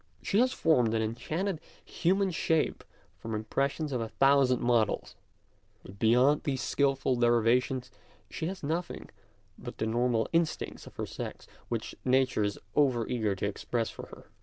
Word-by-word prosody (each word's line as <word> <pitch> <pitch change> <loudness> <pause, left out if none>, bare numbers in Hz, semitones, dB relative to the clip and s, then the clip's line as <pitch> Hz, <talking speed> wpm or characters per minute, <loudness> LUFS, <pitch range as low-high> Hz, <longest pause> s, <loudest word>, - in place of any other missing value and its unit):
She 200 - +1
has 255 +1 +4
formed 125 - +2
an 110 - +1
enchanted 160 - -3 0.2
human 190 +2 +1
shape 160 -1 0 0.4
from 110 -1 -4
impressions 140 +7 -1
of 125 -3 -1
a 115 - -3
thousand 135 -1 +4
models, 120 -3 +1 0.7
but 100 +1 -13
beyond 125 +6 +4
these 135 -2 -2
skilful 135 -2 +1
derivations 120 +2 +2 0.4
she 160 - -4
has 190 -1 -6
nothing 165 +4 -3 0.5
but - - -8
the - - -1
normal 115 0 +1
instincts 165 -1 -1
of - - -13
her - - -3
sex, - - -7 0.2
which - - -3
Nature 130 -2 +2
is 100 0 -1 0.2
over 130 -6 +2
eager 110 -5 0
to 95 - -3
express 115 +3 -2
for - - -9
her. - - -13
125 Hz, 155 wpm, -29 LUFS, 115-150 Hz, 0.7 s, has